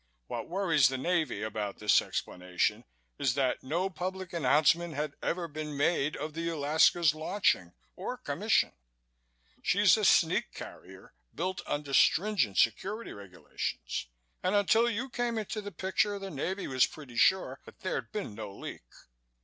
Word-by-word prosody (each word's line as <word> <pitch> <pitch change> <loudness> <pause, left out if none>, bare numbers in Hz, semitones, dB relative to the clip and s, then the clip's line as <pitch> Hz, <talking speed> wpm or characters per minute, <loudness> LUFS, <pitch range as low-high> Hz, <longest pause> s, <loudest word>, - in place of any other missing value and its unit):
What - - -5
worries 170 -8 +3
the 130 +1 -2
Navy 170 -2 0
about 105 -2 -3
this 105 -1 +4
explanation 90 0 -2 0.3
is 130 -4 +1
that 135 -2 +1
no 165 +8 -1
public 185 +1 -5
announcement 160 +2 +3
had 150 0 -2
ever 170 0 -1
been 150 -1 -6
made 145 0 +1
of 150 +1 -5
the 165 +1 -2
Alaska's 160 +1 +3
launching 155 - 0 0.2
or - - -5
commission. - - +1 0.9
She's - - +4
a - - -2
sneak - - +3
carrier - - -11 0.2
built 185 +3 -2
under 145 -1 -3
stringent 165 - +3
security 200 - +1
regulations 90 -11 -5 0.3
and 185 +3 +1
until 220 +4 +4
you 235 +4 -2
came 240 -2 -2
into 215 0 -3
the 205 0 -7
picture 190 +3 0
the 195 -1 -7
Navy 185 +7 -3
was 130 -1 +3
pretty 140 -6 -12
sure 190 +10 +3
that - - -15
there'd - - -3
been 205 - -4
no 105 -1 -7
leak." - - -7
160 Hz, 150 wpm, -30 LUFS, 130-190 Hz, 0.9 s, this